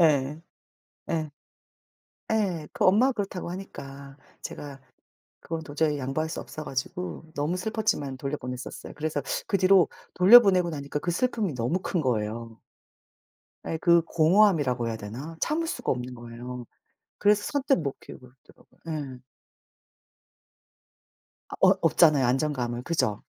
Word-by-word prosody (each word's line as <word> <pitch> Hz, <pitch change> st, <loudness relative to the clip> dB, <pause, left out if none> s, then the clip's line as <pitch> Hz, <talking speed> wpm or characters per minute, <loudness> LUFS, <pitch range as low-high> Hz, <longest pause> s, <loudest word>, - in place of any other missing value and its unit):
예. 150 Hz, -2 st, +3 dB, 0.7 s
예. 155 Hz, -2 st, -1 dB, 1.0 s
예 185 Hz, -8 st, 0 dB
그 -, -, -1 dB
엄마가 230 Hz, +8 st, +5 dB
그렇다고 195 Hz, -5 st, -4 dB
하니까 140 Hz, -7 st, -9 dB, 0.3 s
제가 140 Hz, -2 st, -7 dB, 0.6 s
그건 165 Hz, -1 st, -5 dB
도저히 150 Hz, 0 st, 0 dB
양보할 135 Hz, +4 st, -2 dB
수 -, -, -4 dB
없어 155 Hz, -, -8 dB
가지고 175 Hz, +7 st, -4 dB
너무 150 Hz, +5 st, -1 dB
슬펐지만 205 Hz, -9 st, -1 dB
돌려보냈었어요. 130 Hz, -3 st, -6 dB
그래서 150 Hz, -1 st, -2 dB, 0.2 s
그 200 Hz, -, +1 dB
뒤로 185 Hz, -2 st, +5 dB, 0.3 s
돌려보내고 185 Hz, -3 st, +7 dB
나니까 145 Hz, -1 st, -4 dB
그 175 Hz, -, -2 dB
슬픔이 210 Hz, -, 0 dB
너무 125 Hz, +10 st, -1 dB
큰 180 Hz, -, -1 dB
거예요. 115 Hz, -2 st, -2 dB, 1.1 s
예. 160 Hz, -, -2 dB
그 170 Hz, -1 st, +5 dB
공허함이라고 160 Hz, -, +3 dB
해야 115 Hz, -, -2 dB
되나? 120 Hz, +10 st, -7 dB
참을 330 Hz, +2 st, 0 dB
수가 -, -, -2 dB
없는 125 Hz, 0 st, -3 dB
거예요. 120 Hz, +1 st, -8 dB, 0.5 s
그래서 205 Hz, 0 st, +3 dB
선뜻 275 Hz, -5 st, +2 dB
못 140 Hz, -4 st, -4 dB
키우고 125 Hz, -, -12 dB, 0.2 s
있더라고요. -, -, -23 dB, 0.4 s
예. 125 Hz, -, -23 dB, 2.3 s
아 -, -, -4 dB
어 -, -, +7 dB
얻잖아요, 150 Hz, -5 st, +5 dB
안정감을. 125 Hz, -2 st, -1 dB
그죠? 125 Hz, -10 st, -1 dB
155 Hz, 295 characters per minute, -27 LUFS, 130-185 Hz, 2.3 s, 돌려보내고